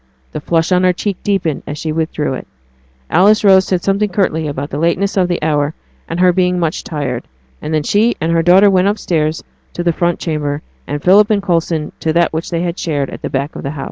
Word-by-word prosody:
The - - -5
flush 165 +3 0
on 180 0 +3
her 180 0 +4
cheek 195 +1 -3
deepened 190 -7 -1
as 145 - -5
she 155 +1 -3
withdrew 155 -3 -2
it. - - -7 0.6
Alice 210 +5 +4
Rose 190 -2 +6
said 180 -2 -1
something 200 +2 +1
curtly 170 -5 0
about 145 0 -5
the 145 - -3
lateness 170 +5 0
of 185 -2 +2
the 175 -1 -1
hour 150 -1 0 0.3
and 165 - -3
her 180 0 +4
being 180 0 +1
much 165 -2 -2
tired; 135 -6 -4 0.3
and 155 - -5
then 155 -1 +1
she 215 +8 +2
and 160 +1 -1
her 165 0 +3
daughter 190 +4 +5
went 185 0 +3
upstairs 165 -7 -1 0.3
to 175 - -3
the 170 -1 +1
front 175 +1 0
chamber, 150 -2 -3 0.2
and 145 0 -4
Philip 200 +3 +5
and 205 -2 +1
Coulson 165 -4 -1
to 160 - -1
that 170 -1 +2
which 160 +1 -3
they 170 0 -1
shared 145 -7 -2
at - - -9
the - - -4
back 140 +3 -3
of - - -6
the 135 - -4
house. 145 0 -7
170 Hz, 230 wpm, -16 LUFS, 155-185 Hz, 0.6 s, Rose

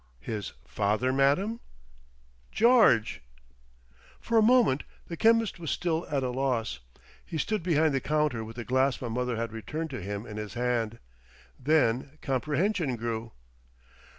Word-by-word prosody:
"His 105 - -5
father, 110 +5 0
madam?" 145 - +2 0.9
"George." 220 - +4 1.0
For 230 - -2
a - - +5
moment 225 - +4 0.2
the 170 - -6
chemist 225 0 +3
was 165 -3 -4
still 170 -2 -1
at 140 -2 0
a 125 - -1
loss. 125 - -1 0.4
He 160 - -5
stood 215 +6 -1
behind 160 -3 +2
the 135 - 0
counter 150 -7 0
with 110 +1 -9
the 120 -1 -6
glass 130 +1 +1
my 120 - -4
mother 125 +1 -1
had 115 0 -3
returned 150 +9 -5
to 130 -5 -5
him 100 +3 -5
in 105 -3 -8
his 105 +1 -6
hand. 120 -2 -1 0.6
Then 135 -1 +1
comprehension 150 - 0
grew. 115 0 -4
130 Hz, 145 wpm, -28 LUFS, 115-160 Hz, 1.0 s, a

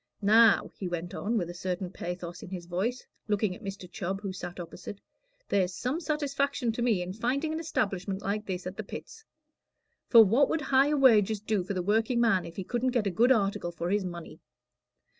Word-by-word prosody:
"Now," 220 +1 +5
he 190 - -5
went 175 0 -4
on, 225 +3 -1
with 175 -5 -1
a 175 - -7
certain 180 0 -4
pathos 175 -1 -6
in - - -9
his 180 -2 -6
voice, 195 +9 -2 0.2
looking 210 -3 0
at - - -14
Mr. 195 -2 -6
Chubb, 195 +1 -4
who 195 -2 -4
sat 180 -1 -7
opposite, 175 +3 -8 0.5
"there's 185 -2 +1
some 260 - -2
satisfaction 280 -6 -1
to 225 - -4
me 225 -7 +2
in 180 +1 -6
finding 265 +9 -1
an 315 - -2
establishment 200 - -2
like 210 +2 -2
this 185 -2 -4
at 185 +1 -6
the 215 - -4
Pits. 445 - -9 0.8
For 230 -2 +8
what 245 +8 +3
would 320 - 0
higher 280 +1 +3
wages 220 -6 +5
do 210 -2 -1
for 190 +2 -4
the 180 - -1
workingman 225 -1 +2
if 170 - -9
he 190 - -4
couldn't 245 +5 -1
get 220 - 0
a 200 - 0
good 235 +8 +4
article 200 -6 +1
for 170 +1 -3
his 205 -1 +1
money? 175 -2 -7
200 Hz, 200 wpm, -29 LUFS, 180-240 Hz, 0.8 s, For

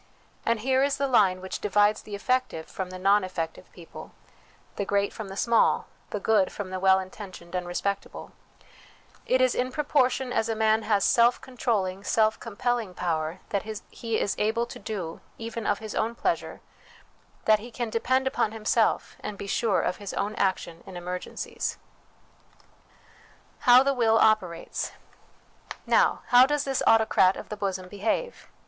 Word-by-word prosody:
And 230 -2 +1
here 260 +2 +2
is 280 +1 +1
the 280 - 0
line 195 -8 +3
which 190 - -5
divides 210 +1 +2
the 210 - -7
effective 250 -7 -1
from 190 -1 -6
the 185 - -7
non 195 +2 +3
effective 165 -3 -5
people, 170 -2 -12 0.6
the - - -2
great 200 0 0
from 220 -3 -7
the 195 0 -8
small, 235 +1 +3 0.2
the 210 - -3
good 205 -2 +2
from 195 -2 -6
the 185 - -3
well 190 0 +5
inten 190 +2 -6
tioned 170 -1 -13
and 180 -1 -2
respectable; 200 +3 -4 1.0
it 255 0 +3
is 255 -1 +4
in 255 +1 -1
proportion 265 -3 +1
as 225 - 0
a 225 - 0
man 220 0 +3
has 205 -3 +1
self 235 +1 +4
controlling, 205 -7 -2
self 220 +1 +2
compelling 230 -3 -2
power 165 0 -2
that 200 - 0 0.3
he 230 -2 -2
is 200 - -1
able 220 +3 +1
to 235 - -10
do, 195 -6 -5 0.2
even 230 -1 -5
of 205 - +2
his 215 -1 -7
own 230 +2 -1
pleasure; 350 +7 -2 0.8
that 215 -1 +5
he 235 +3 -9
can 235 -1 -4
depend 260 +4 +1
upon 225 -4 0
himself, 225 +1 0
and 210 -1 -6
be 200 - -6
sure 200 -1 +1
of - - -1
his 205 -2 -7
own 205 +2 -1
action 185 -4 -1
in 185 - -8
emergencies. 180 +1 -4 1.8
How 250 +1 +7
the 275 0 +2
Will 225 -3 +3
operates. 190 -7 +1 0.9
Now, - - +3
how 250 +1 +7
does 295 0 0
this 270 -1 -1
autocrat 220 -4 +4
of - - -9
the 210 - -4
bosom 190 -2 -3
behave? 215 - -3
215 Hz, 165 wpm, -26 LUFS, 190-235 Hz, 1.8 s, How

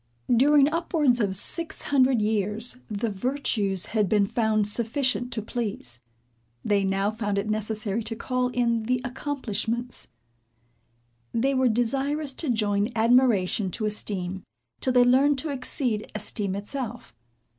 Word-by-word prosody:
During 280 +3 +5
upwards 310 -5 +1
of 200 -4 +1
six 330 - -1
hundred 260 -5 +3
years, 215 +3 -1
the 215 +1 -2
virtues 200 -4 -1
had 210 -4 0
been 205 -2 +3
found 220 -1 +1
sufficient 245 +3 0
to 220 -3 -3
please. 205 - -3 0.7
They 205 -1 +2
now 195 +1 +1
found 205 -2 -2
it 200 +1 -1
necessary 215 0 -2
to 225 0 -4
call 250 +2 -1
in 235 -2 0
the 250 +2 +1
accomplishments. 245 -3 -3 1.3
They 265 +4 +1
were 260 -1 +3
desirous 270 +5 0
to 315 - -2
join 210 -2 +1
admiration 225 -5 +3
to 215 +5 -3
esteem, 195 -3 -2 0.4
'till 255 - +1
they 250 -1 +6
learned 270 +3 +4
to 300 +3 -2
exceed 255 -4 -2
esteem 200 -3 -2
itself. 205 - -6
230 Hz, 135 wpm, -26 LUFS, 205-255 Hz, 1.3 s, they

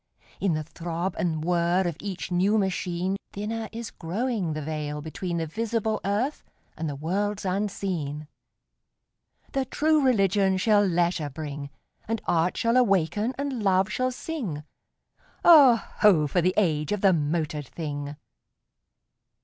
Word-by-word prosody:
In 195 -4 +1
the 155 - -2
throb 170 +3 -4
and 160 -3 -1
whir 175 +1 +2
of 170 -3 -1
each 195 -2 -5
new 190 +5 +3
machine 185 -1 -1 0.2
Thinner 220 +2 -4
is 230 0 -6
growing 195 0 -2
the 155 - -4
veil 150 -1 -3
between 170 +3 -4
The 165 - -1
visible 220 +4 -1
earth 215 +9 -1 0.3
and 160 -1 -3
the 145 - -4
worlds 195 +7 -2
unseen. 180 -6 -2 1.2
The 270 -1 0
True 305 +3 +2
Religion 195 -5 +3
shall 205 +1 +4
leisure 170 -4 +1
bring; 145 -1 -6 0.4
And 225 +1 -1
Art 175 +1 +1
shall 230 +2 +2
awaken 210 +1 +2
and 275 -4 -3
Love 190 -1 +2
shall 255 +3 0
sing: 245 - -5 0.8
Oh, 290 -8 +9 0.2
ho! 185 -8 +5
for 160 +5 +1
the 185 +2 +1
age 155 -7 +1
of 210 -2 -1
the 195 -2 +5
motored 150 -2 -1
thing! 145 -3 -5
185 Hz, 140 wpm, -26 LUFS, 160-215 Hz, 1.2 s, Oh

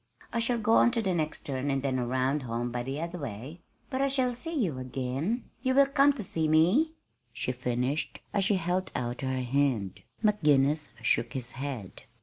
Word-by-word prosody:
"I 235 - +1
shall 235 +1 +1
go 225 0 +3
on - - +6
to 230 - +1
the 190 -2 +1
next 155 -3 -1
turn, 140 -2 -3
and 135 -1 0
then 130 -2 0
around 130 +4 0
home 120 -1 -3
by 120 0 -2
the 135 +4 -4
other 170 +2 -4
way.... 135 - -7 0.3
But 260 0 0
I 275 - +3
shall 260 -2 +1
see 325 +8 -5
you 220 - +1
soon 130 - -6
again? 135 - -2
you 260 0 +1
will 280 0 +7
come 275 +1 +4
to 245 -6 -4
see 160 -3 0
me?" 180 - +4 0.4
she 120 - -2
finished, 125 +4 -2
as 200 - +2
she 205 0 +3
held 180 +1 -1
out 120 +1 -2
her 130 -1 -1
hand. 125 -7 0 0.2
McGinnis 150 -7 +3
shook 120 - +1
his 125 -2 -4
head. 130 -8 -6
145 Hz, 200 wpm, -29 LUFS, 130-210 Hz, 0.4 s, will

